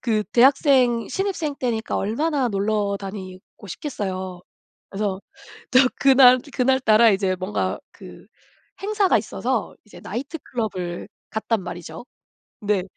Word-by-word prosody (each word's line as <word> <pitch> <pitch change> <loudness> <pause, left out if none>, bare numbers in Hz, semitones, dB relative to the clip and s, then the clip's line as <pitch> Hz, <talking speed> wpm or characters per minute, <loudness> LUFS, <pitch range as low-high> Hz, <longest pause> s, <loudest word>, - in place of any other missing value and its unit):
그 215 -3 0
대학생 255 -2 +4
신입생 380 -7 -2
때니까 235 -3 -2
얼마나 270 +6 0
놀러 205 0 0
다니고 190 0 -9
싶겠어요. 190 - -5 0.5
그래서 195 -1 -2 0.5
또 255 - +6 0.2
그날 260 -2 +7
그날따라 245 -3 +4
이제 190 -1 0
뭔가 185 +3 -2
그 - - -13 0.6
행사가 405 - +2
있어서 235 +3 -3
이제 210 - -14
나이트클럽을 220 - -5 0.2
갔단 220 0 -1
말이죠. 175 +1 -8 0.5
근데 205 -3 0
220 Hz, 270 characters per minute, -22 LUFS, 195-260 Hz, 0.6 s, 그날